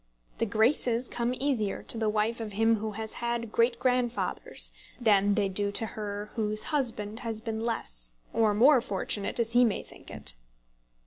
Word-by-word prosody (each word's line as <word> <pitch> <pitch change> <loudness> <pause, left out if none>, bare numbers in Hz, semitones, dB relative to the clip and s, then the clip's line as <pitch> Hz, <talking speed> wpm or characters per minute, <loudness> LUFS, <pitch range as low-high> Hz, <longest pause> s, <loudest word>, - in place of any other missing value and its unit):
The 230 - +1
graces 235 +2 +2
come 240 +1 -1
easier 250 -7 -1
to - - -1
the 220 -1 0
wife 215 +2 0
of 220 -2 -5
him 225 +2 +3
who 215 0 -4
has 220 +1 -5
had 235 -1 -2
great 235 +1 +2
grandfathers 250 -1 +1 0.3
than 205 -3 +4
they 205 -2 +2
do 200 +1 -1
to 225 - -1
her 210 -1 -5
whose 215 -2 +1
husband 225 -6 -1
has 225 -3 -4
been 225 0 -4
less, - - -3 0.2
or 220 -2 +3
more 260 +4 +6
fortunate, 200 +1 -1
as 230 -1 +1
he 245 +1 +6
may 225 -4 +1
think - - -14
it. - - -3
225 Hz, 175 wpm, -29 LUFS, 210-235 Hz, 0.3 s, more